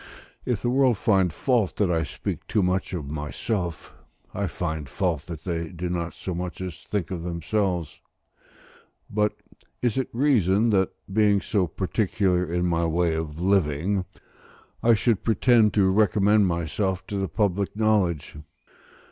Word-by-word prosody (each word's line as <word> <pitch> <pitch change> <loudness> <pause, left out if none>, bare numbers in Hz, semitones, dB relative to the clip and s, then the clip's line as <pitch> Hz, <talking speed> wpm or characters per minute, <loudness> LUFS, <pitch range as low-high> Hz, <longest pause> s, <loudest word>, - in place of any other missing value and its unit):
If 120 -5 -1
the 120 - +1
world 130 -3 +3
find 95 -5 +2
fault 115 - +1
that 100 -4 +1
I 85 -1 +2
speak 75 - -5
too 105 - +1
much 90 +1 0
of 75 -5 -5
myself, 80 +4 -4 0.4
I 100 0 -1
find 80 -6 -4
fault 85 -4 -1
that 80 -3 -7
they 85 -2 -2
do 90 0 -4
not 85 -1 -3
so 95 - -5
much 90 +1 -5
as 90 -4 -6
think 95 -5 -3
of 90 -3 -3
themselves. 90 0 -2 1.1
But 105 0 +1 0.5
is 120 0 0
it 130 - -2
reason 115 - +3
that, 95 -2 +3 0.2
being 105 -1 +4
so 95 -2 0
particular 90 +1 0
in 90 +1 -1
my 85 -1 +1
way 85 0 +1
of 80 -1 -4
living, 95 0 +1 0.8
I 115 0 +5
should 110 -1 +1
pretend 115 0 +4
to 95 -3 +4
recommend 105 0 +4
myself 90 +3 -1
to 100 - -4
the 95 -2 -2
public 100 +2 0
knowledge? 100 -10 +1
95 Hz, 150 wpm, -25 LUFS, 85-105 Hz, 1.1 s, I